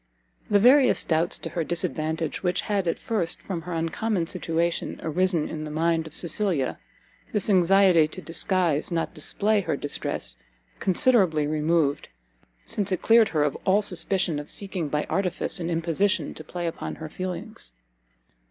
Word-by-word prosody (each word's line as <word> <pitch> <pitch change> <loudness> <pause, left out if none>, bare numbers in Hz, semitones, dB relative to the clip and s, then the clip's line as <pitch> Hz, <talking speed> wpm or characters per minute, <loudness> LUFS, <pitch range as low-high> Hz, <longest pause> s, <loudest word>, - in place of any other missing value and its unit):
The 205 - +5
various 255 +6 +5
doubts 165 +1 +1
to 165 - -6
her 170 0 -1
disadvantage, 160 -1 -2
which 180 -1 0
had 200 -4 -1
at 165 - 0
first, 190 -8 -1
from 180 -4 -5
her 180 +1 -6
uncommon 170 +3 -1
situation, 170 -1 -2
arisen 175 0 +1
in 155 -1 -5
the 155 - -5
mind 160 +1 0
of 160 - -10
Cecilia, 170 -6 -1 0.5
this 210 0 +1
anxiety 185 -3 +5
to 155 - -9
disguise, 170 -2 0
not 165 -2 -2
display 205 +7 +1
her 160 - -2
distress, - - -4 0.4
considerably 185 -6 +3
removed, 155 -1 0 0.6
since 205 -2 -2
it 185 - -1
cleared 225 -1 +5
her 155 -2 +1
of 145 -2 0
all 200 +2 +3
suspicion 180 -3 0
of 145 - -8
seeking 190 -6 -3
by 150 +1 0
artifice 180 +1 -1
and 170 -1 -3
imposition 170 +1 0
to 155 - -9
play 175 +3 -5
upon 165 - -4
her 160 - -7
feelings. 185 - -6
170 Hz, 155 wpm, -25 LUFS, 160-195 Hz, 0.6 s, The